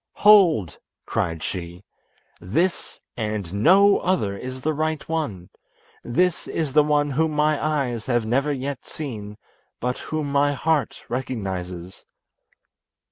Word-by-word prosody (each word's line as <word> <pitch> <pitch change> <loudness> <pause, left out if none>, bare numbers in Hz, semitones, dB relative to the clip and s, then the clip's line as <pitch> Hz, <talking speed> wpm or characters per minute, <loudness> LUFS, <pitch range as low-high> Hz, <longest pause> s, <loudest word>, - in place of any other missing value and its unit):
"Hold!" 175 - +5 0.3
cried 80 -2 -2
she. 90 0 -5 0.6
"This 165 - -1 0.2
and 105 -5 -3
no 190 - +5
other 135 - 0
is 130 +5 -7
the 155 +4 0
right 155 0 -2
one; 115 - -3 0.5
this 175 +9 0
is 155 -5 -2
the 150 - +7
one 145 -1 +1
whom 155 +3 +1
my 150 0 +1
eyes 135 -7 -1
have 120 -3 +1
never 135 +6 +1
yet 140 -1 -4
seen, 105 -9 -7 0.4
but 125 +1 -2
whom 155 -2 -3
my 145 +1 +3
heart 155 +1 -1
recognises." 95 -8 -5
135 Hz, 125 wpm, -23 LUFS, 105-155 Hz, 0.6 s, the